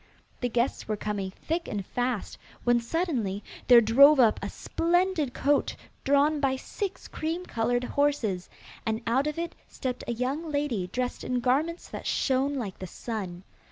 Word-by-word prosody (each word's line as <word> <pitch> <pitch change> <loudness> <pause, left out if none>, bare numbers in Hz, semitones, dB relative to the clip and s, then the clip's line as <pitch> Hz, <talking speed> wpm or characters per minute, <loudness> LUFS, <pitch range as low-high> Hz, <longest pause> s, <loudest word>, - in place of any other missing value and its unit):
The 245 - -1
guests 240 +2 0
were 215 -1 -1
coming 205 -2 -3
thick 325 - -3
and 200 -3 -3
fast, 245 -2 -2 0.2
when 240 0 +4
suddenly 235 - -1 0.2
there 245 -2 +9
drove 275 +6 +7
up 230 -4 +5
a - - -3
splendid 345 -4 0
coach 285 +1 +1 0.3
drawn 285 +2 +3
by 270 -2 +2
six 390 +8 -5
cream 330 +3 -3
coloured 245 -1 0
horses, 250 -10 0 0.3
and 220 +1 -2
out 260 +5 +2
of 300 - -3
it 335 0 -3
stepped 255 -1 -4
a 240 - 0
young 275 +7 -2
lady 280 -11 -1
dressed 250 +6 -3
in 250 -1 0
garments 285 +8 0
that - - -6
shone 270 +1 +1
like 215 -8 -4
the 185 - -5
sun. 190 -3 -5
255 Hz, 160 wpm, -28 LUFS, 225-295 Hz, 0.3 s, there